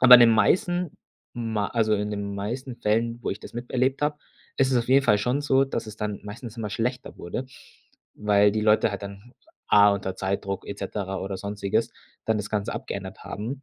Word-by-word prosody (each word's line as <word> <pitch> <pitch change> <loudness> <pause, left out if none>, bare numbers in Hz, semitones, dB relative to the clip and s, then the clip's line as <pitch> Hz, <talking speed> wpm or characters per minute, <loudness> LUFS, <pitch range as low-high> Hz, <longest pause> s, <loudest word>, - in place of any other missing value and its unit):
aber 125 -1 +10
in 120 - +10
den 115 -1 +8
meisten 175 - +2 0.4
ma 110 -4 -2
also 110 -2 +2
in 105 +1 -1
den 100 -1 -3
meisten 120 +5 -4
Fällen, 115 +2 0
wo - - -1
ich 100 - -4
das - - -11
miterlebt 130 +3 -1
habe, 150 0 0 0.4
ist 135 0 +3
es - - +4
auf 120 - -2
jeden 135 +1 +5
Fall 105 - +5
schon 125 +7 0
so, 135 -2 +3
dass 115 -4 -4
es 110 0 -9
dann 105 -2 -3
meistens 115 +2 -8
immer 110 -2 -3
schlechter 125 +4 -3
wurde, 125 +9 -5 0.7
weil 105 -1 +4
die 110 - 0
Leute 105 0 +4
halt 100 0 -5
dann, 100 +4 -9 0.4
A 105 0 +8
unter 95 -1 -3
Zeitdruck 100 0 -3
et 100 - -6
cetera 95 -1 -3
oder 95 0 -4
Sonstiges, 100 0 -1 0.3
dann 110 -1 +1
das 105 - -5
Ganze 105 -2 -1
abgeändert - - -6
haben. 125 +7 -5
110 Hz, 205 wpm, -25 LUFS, 100-125 Hz, 0.7 s, aber